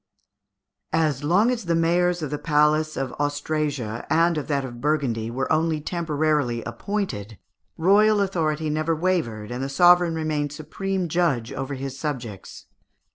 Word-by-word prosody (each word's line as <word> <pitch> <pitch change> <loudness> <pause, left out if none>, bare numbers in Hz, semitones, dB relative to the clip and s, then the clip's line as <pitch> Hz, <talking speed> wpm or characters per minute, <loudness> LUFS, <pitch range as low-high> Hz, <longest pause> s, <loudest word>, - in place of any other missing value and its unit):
As 150 -4 +1
long 195 +10 +3
as 235 -5 -3
the 170 -1 +1
mayors 175 +1 +2
of 150 - -4
the 150 - -2
palace 155 0 +2
of 135 -2 -3
Austrasia, 145 -5 -2
and 170 +1 +3
of 150 - -3
that 140 -3 0
of 120 -2 -9
Burgundy, 135 -7 0
were 130 +3 -3
only 160 0 +1
temporarily 150 -7 -1
appointed, 115 - -4 0.4
royal 205 +5 +4
authority 160 -6 0
never 155 +2 0
wavered, 155 - -1
and 125 +2 -3
the 135 - -3
sovereign 175 +3 +5
remained 150 -2 -2
supreme 185 +5 -3
judge 150 -9 0
over 135 +1 -4
his 135 0 -6
subjects. 120 - -6
155 Hz, 145 wpm, -24 LUFS, 135-170 Hz, 0.4 s, sovereign